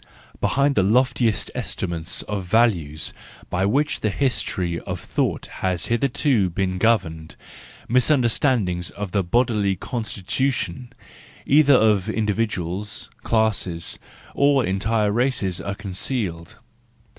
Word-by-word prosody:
Behind 140 +1 +2
the 100 - +3
loftiest 120 +2 +2
estimates 85 -1 -3
of 100 -2 -4
value 90 -7 +2 0.5
by 95 +2 +1
which 145 +8 +1
the 110 - 0
history 95 -8 -1
of - - -5
thought - - -2 0.2
has 90 -2 0
hitherto 120 -4 +2
been 95 +1 -2
governed, 80 -8 0 0.5
misunderstandings 120 - +2
of 100 -2 -6
the 100 0 +1
bodily 105 -1 +1
constitu¬ 115 +5 -2
tion, 125 -1 -5 0.5
either 145 -1 +6
of 105 -5 +3
individuals, 105 -2 -2
classes, 105 -7 0 0.3
or 140 -3 +3
entire 105 +3 +1
races 110 -6 0
are 100 - -4
concealed. 95 -4 -4
105 Hz, 110 wpm, -23 LUFS, 90-125 Hz, 0.5 s, either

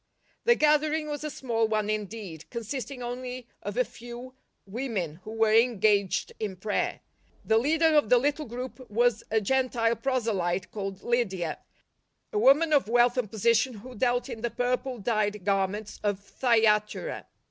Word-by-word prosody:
The 475 - +6
gathering 305 -1 +2
was 295 0 -4
a 305 - -2
small 230 -5 -1
one 215 -1 0
indeed, 210 -6 -5
consisting 250 +2 -5
only 250 +1 -5 0.2
of 205 +2 -5
a 250 - +3
few. 240 +2 -10 0.3
women, 195 - -4
who 215 - -8
were 225 -1 +2
engaged 215 -4 +3
in 205 -3 -3
prayer. 205 +3 -2 0.4
The 220 0 +4
leader 315 +6 +2
of 295 -8 +4
the 250 - +7
little 290 +3 0
group 250 +2 -7
was 235 +1 +2
a 220 - +2
Gentile 235 0 +1
proselyte 200 -10 -1
called 195 -2 -5
Lydia, 190 -9 -1 0.7
a 420 - +1
woman 310 -1 +5
of 280 -7 +4
wealth 240 +1 +4
and 250 -5 -1
position 230 +3 +2
who 250 +5 -10
dealt 245 +1 0
in 225 - -7
the 235 - -1
purple 250 +1 -1
dyed 210 -3 -1
garments 200 +1 -1
of 205 -2 0
Thyatira. 220 - +1
235 Hz, 155 wpm, -27 LUFS, 210-255 Hz, 0.7 s, the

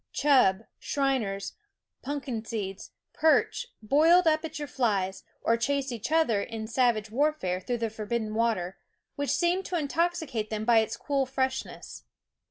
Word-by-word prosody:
Chub, 250 -9 +4 0.2
shiners, 250 -9 -1 0.2
" - - -59
punkin 270 -5 -4
seeds," 200 -4 -5 0.2
perch, 320 +9 +2 0.2
boiled 325 +10 +5
up 310 0 +3
at 315 -1 -5
your 295 -1 -4
flies, 200 -8 -1 0.2
or 230 - +3
chased 275 +3 -1
each 235 +4 -5
other 315 -11 +3
in 220 +1 -5
sav 240 0 +2
age 215 0 -7
warfare 265 -9 0
through 240 +6 -2
the 230 -1 -2
forbidden 215 0 -3
water, 215 -5 0 0.4
which 285 0 -2
seemed 355 +2 +1
to 360 - -2
intoxicate 310 -7 -1
them 215 0 -3
by 235 -1 +6
its 220 - -1
cool 275 -2 -1
freshness. 265 0 -3
245 Hz, 155 wpm, -28 LUFS, 215-295 Hz, 0.4 s, by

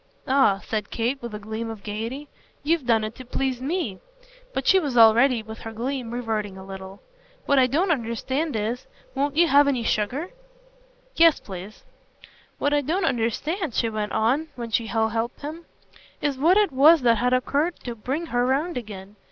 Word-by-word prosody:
"Ah," 260 -8 +3
said 215 -2 -3
Kate 245 +4 -2
with 235 -3 -6
a - - -3
gleam 220 +2 -5
of 220 -3 -8
gaiety, 230 +7 -5 0.4
"you've 310 -3 0
done 225 -2 +3
it 215 +1 -4
to 255 - -10
please 255 0 -2
ME." 270 - -2 0.5
But - - -3
she 385 - +6
was 285 -8 -2
already, 230 +2 +6
with 220 0 -9
her 225 - -7
gleam, 245 +2 -4
reverting 220 -5 -3
a 190 - -10
little. 190 0 -9 0.4
"What 280 -1 +4
I 255 - +5
don't 330 +8 +1
understand 265 +3 -2
is 220 +4 -3 0.3
won't 285 +2 -1
you 340 0 +5
have 285 -2 +5
any 255 -4 0
sugar?" 245 - -1 0.8
"Yes, 330 -2 +5
please." 190 +2 -9 0.7
"What 285 - 0
I 290 - +3
don't 335 +7 -1
understand," 280 - -1
she 230 - +1
went 215 -1 -3
on 255 +9 +1
when 235 -2 -6
she 230 0 0
had 220 0 +1
helped 230 +2 -3
him, 315 +3 -7 0.5
"is 290 -2 -1
what 325 +9 +4
it 420 -5 +3
was 295 +4 +6
that 230 -3 +4
had 250 +1 +1
occurred 285 +6 0
to 240 - -5
bring 265 +9 -3
her 245 0 +2
round 280 +7 0
again. 205 -3 -8
245 Hz, 185 wpm, -24 LUFS, 220-290 Hz, 0.8 s, she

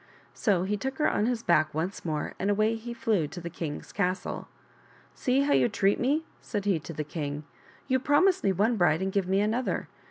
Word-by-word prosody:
So 195 -6 +1
he 205 +2 -1
took 265 +5 -4
her 305 - +3
on 210 - +1
his 240 -2 -1
back 155 -3 +3
once 175 +5 -2
more 155 -3 -2
and 195 - 0
away 215 +2 +3
he 225 +1 -6
flew 215 -9 0
to 175 - -8
the 170 0 -6
king's 155 -3 -5
castle. 185 -2 -2 0.3
" - - -30 0.3
See 260 +2 +1
how 285 +1 +2
you - - +4
treat 200 -2 +2
me," 295 +6 +1 0.2
said 205 -3 -4
he 195 -5 +2
to 165 - -8
the 150 - -3
king, 145 -1 -4 0.2
" - - -26
you 260 -1 +2
promise 355 +8 +3
me 195 - +3
one 215 +5 +2
bride 175 -1 +3
and 190 - -1
give 195 -2 0
me 190 +1 +2
another. 225 +5 -1
200 Hz, 225 wpm, -28 LUFS, 170-240 Hz, 0.3 s, you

